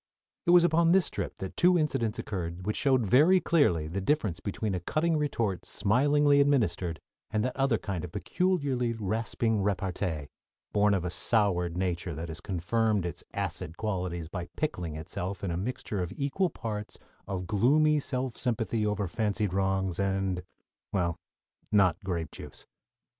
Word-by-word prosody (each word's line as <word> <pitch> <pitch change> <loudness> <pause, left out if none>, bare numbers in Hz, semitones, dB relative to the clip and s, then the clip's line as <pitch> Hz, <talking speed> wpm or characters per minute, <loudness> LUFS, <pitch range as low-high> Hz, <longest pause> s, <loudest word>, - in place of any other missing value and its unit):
It - - +3
was 175 0 +8
upon 170 0 +4
this 190 -2 +3
trip - - -4
that 95 - -6
two 180 0 +5
incidents 135 -8 0
occurred 90 -5 -4
which 105 - -1
showed 130 -5 +2
very 155 - +6
clearly 145 - +2
the 95 +5 -3
difference 105 - 0
between 100 +1 -3
a 90 - -1
cutting 160 - 0
retort 115 - -1
smilingly 140 +7 +3
administered 95 - +1 0.3
and 110 +1 0
that 125 - -2
other 135 -4 +2
kind 95 -3 -4
of 90 - -6
peculiarly 140 - 0
rasping 110 0 -1
repartee, 90 -6 -2 0.4
born 105 -1 +4
of 90 -2 -2
a 90 - -2
soured 90 -4 +2
nature 90 -2 -2
that 85 +2 -5
has 80 +2 -6
confirmed 100 +2 0
its 85 -3 -5
acid 80 +2 -4
qualities 90 -6 -2
by 90 +1 -6
pickling 90 - -2
itself 90 +5 -5
in 95 - -1
a - - -2
mixture 100 0 -3
of 90 - -3
equal 145 +7 0
parts 105 -6 -5 0.3
of 95 -2 -3
gloomy 145 - +3
self 130 -3 -2
sympathy 115 -3 -1
over 105 -2 0
fancied 105 0 -1
wrongs, 95 -2 0
and 95 -2 0 0.5
well, 85 -3 0 0.5
not 100 -2 +3
grape 85 -4 -3
juice. - - -11
105 Hz, 160 wpm, -29 LUFS, 90-130 Hz, 0.5 s, was